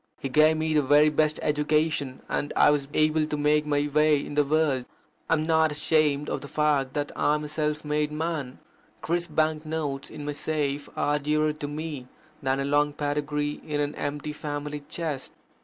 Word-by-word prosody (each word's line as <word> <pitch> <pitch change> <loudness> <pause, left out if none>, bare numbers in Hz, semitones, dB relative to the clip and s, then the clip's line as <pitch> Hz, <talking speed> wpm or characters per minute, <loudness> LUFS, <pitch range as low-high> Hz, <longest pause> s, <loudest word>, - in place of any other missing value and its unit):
He 135 - -4
gave 155 +4 +4
me 160 0 0
the 150 - +4
very 145 +2 +5
best 155 0 +1
education, 150 -2 0
and 145 - -2
I - - +6
was 145 -2 0
able 155 0 +2
to 150 - -2
make 150 +1 +2
my 145 0 +1
way 150 0 +3
in - - -7
the 150 0 +3
world. 145 -3 +1 0.4
I - - +4
am 155 - -1
not 160 -1 +3
ashamed 150 -1 +1
of - - -3
the 140 - -8
fact 145 -3 +1
that 145 0 -1
I 150 - +2
am 150 - -3
a - - -4
self 150 0 -2
made 150 0 0
man. 150 -4 -3 0.5
Crisp 170 -2 -1
bank 155 -1 +1
notes 155 -3 -3
in 150 -2 -8
my 145 - -2
safe 145 -1 -2
are 145 0 +1
dearer 150 +1 +1
to 150 -1 -5
me 145 -3 -5 0.3
than 135 -1 0
a 135 - -1
long 145 +1 +2
pedigree 145 0 -2
in 150 -1 -3
an 145 0 0
empty 145 +1 -4
family 150 0 -4
chest. 155 -6 -4
150 Hz, 195 wpm, -26 LUFS, 145-155 Hz, 0.5 s, I